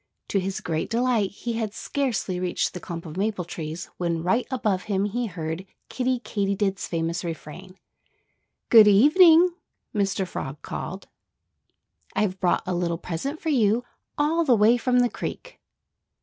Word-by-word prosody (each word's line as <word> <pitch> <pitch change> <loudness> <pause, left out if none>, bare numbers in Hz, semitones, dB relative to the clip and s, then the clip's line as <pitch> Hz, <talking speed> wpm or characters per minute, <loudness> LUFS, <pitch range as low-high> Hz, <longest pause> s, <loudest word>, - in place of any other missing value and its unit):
To 200 - +1
his 190 +1 -3
great 160 -1 -2
delight 235 -3 +1
he 235 +4 -5
had 225 -2 -3
scarcely 235 -10 -2
reached 180 -1 -1
the 180 - -6
clump 170 -1 -7
of 160 +1 -8
maple 200 -3 -1
trees 160 -1 -6
when 170 -2 -1
right 230 +8 +1
above 215 -8 -1
him 195 0 +1
he 235 +4 -2
heard 165 -1 -5 0.3
Kiddie 255 -1 -1
Katydid's 200 -1 -1
famous 165 +1 -2
refrain. 175 +3 -8 0.9
"Good 220 -3 +9
evening!" 325 - +7 0.4
Mr. 195 -2 0
Frog 135 -4 -6
called. 190 +2 -6 1.1
"I've 190 -3 0
brought 180 - +1
a 185 - -2
little 175 -1 -1
present 185 - -4
for 325 - -3
you, 235 -4 +3 0.3
all 315 +3 +2
the 260 -6 +4
way 220 +2 +5
from 250 +1 +2
the 245 - +4
creek." - - -7
200 Hz, 150 wpm, -25 LUFS, 180-245 Hz, 1.1 s, Good